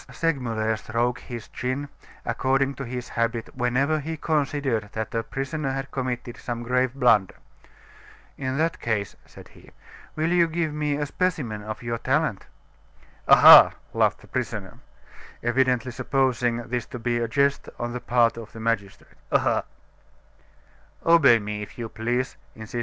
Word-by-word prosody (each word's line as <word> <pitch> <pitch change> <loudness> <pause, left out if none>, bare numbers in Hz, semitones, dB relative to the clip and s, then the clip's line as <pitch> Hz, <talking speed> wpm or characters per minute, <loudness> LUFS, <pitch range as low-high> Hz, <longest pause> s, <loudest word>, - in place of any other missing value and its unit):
Segmuller 115 -9 -1
stroked 120 +3 -1
his 120 -4 -8
chin, 130 +3 -3 0.4
according 135 +1 +1
to 140 - -7
his 125 -1 -6
habit 115 0 -2
whenever 135 +5 +1
he 160 +2 -5
considered 140 -8 -1
that 110 -1 -4
a 115 - 0
prisoner 135 +4 -4
had 135 0 -5
committed 125 -2 -4
some 120 -1 -5
grave 125 +1 +1
blunder. 115 -8 +3 1.0
"In 130 0 -3
that 165 +2 0
case," 105 -4 -2
said - - -14
he, - - -18 0.5
"will 155 +1 0
you 175 -1 +4
give 160 -2 -2
me 150 -1 -1
a 145 0 -1
specimen 145 -10 -2
of 110 +2 -7
your 115 -1 -3
talent?" 135 -5 0 0.8
"Ah, - - +9
ha!" - - +10 0.2
laughed - - +1
the - - -16
prisoner, - - -4 0.6
evidently 125 0 +1
supposing 120 -2 0
this 120 0 -3
to - - -7
be 120 0 -1
a 115 - -1
jest 140 +4 +1
on 120 0 -4
the 125 - -5
part 120 -1 +2
of 115 -2 -9
the 115 - -9
magistrate. 110 -4 -3 0.2
"Ah, - - +2 1.4
ha!" 115 -3 0
125 Hz, 140 wpm, -25 LUFS, 115-140 Hz, 1.4 s, ha